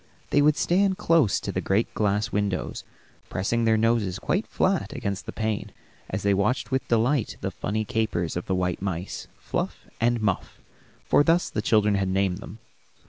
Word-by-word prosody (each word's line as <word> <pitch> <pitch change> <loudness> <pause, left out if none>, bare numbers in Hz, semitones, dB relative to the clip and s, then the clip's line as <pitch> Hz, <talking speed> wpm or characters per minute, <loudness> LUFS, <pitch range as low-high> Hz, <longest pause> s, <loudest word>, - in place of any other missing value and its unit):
They 145 - +4
would 150 +1 +4
stand 190 +1 +2
close 165 -11 +3
to - - -3
the - - -2
great 100 +4 0
glass 105 +1 0
window, 100 -2 -1 0.6
pressing 115 +6 0
their 110 -1 +4
noses 110 -4 +1
quite 195 +5 -1
flat 190 -5 0
against 100 -7 -4
the - - -3
pane, 110 -2 -2 0.4
as 95 - -3
they 100 0 +3
watched 105 +9 0
with 130 0 0
delight 120 +2 +1
the 95 - -2
funny 110 +4 -2
capers 110 -8 -1
of 90 - -4
the 95 - +1
white 90 -1 -1
mice, 95 -1 -4
Fluff - - -4 0.2
and 120 +1 +2
Muff, 105 -4 -2 0.5
for - - +4
thus 170 +3 +2
the 105 - -1
children 105 -1 +3
had 95 -1 +1
named 95 -1 +1
them. 110 - -9
110 Hz, 180 wpm, -26 LUFS, 95-120 Hz, 0.6 s, They